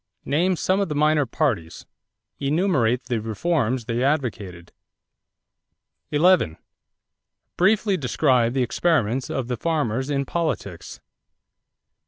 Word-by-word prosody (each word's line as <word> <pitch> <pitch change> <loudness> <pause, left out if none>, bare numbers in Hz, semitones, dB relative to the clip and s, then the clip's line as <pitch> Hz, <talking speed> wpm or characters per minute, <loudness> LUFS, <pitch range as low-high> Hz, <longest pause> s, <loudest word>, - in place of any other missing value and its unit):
Name 175 +6 +1
some 185 +3 0
of 200 - -1
the 150 - -3
minor 150 -1 +2
parties. 110 - -2 0.5
Enumerate 140 - +1
the 120 -3 -2
reforms 120 - -1
they 120 +2 -1
advocated. 110 - -2 1.4
11. 175 - +4
Describe 80 - -19 0.9
briefly 200 +2 +2
the 130 -3 +1
experiments 125 -3 0
of 130 -3 -3
the 125 -1 -3
farmers 135 -4 -1
in 140 -1 0
politics. 160 -4 -4
135 Hz, 105 wpm, -23 LUFS, 115-165 Hz, 1.4 s, 11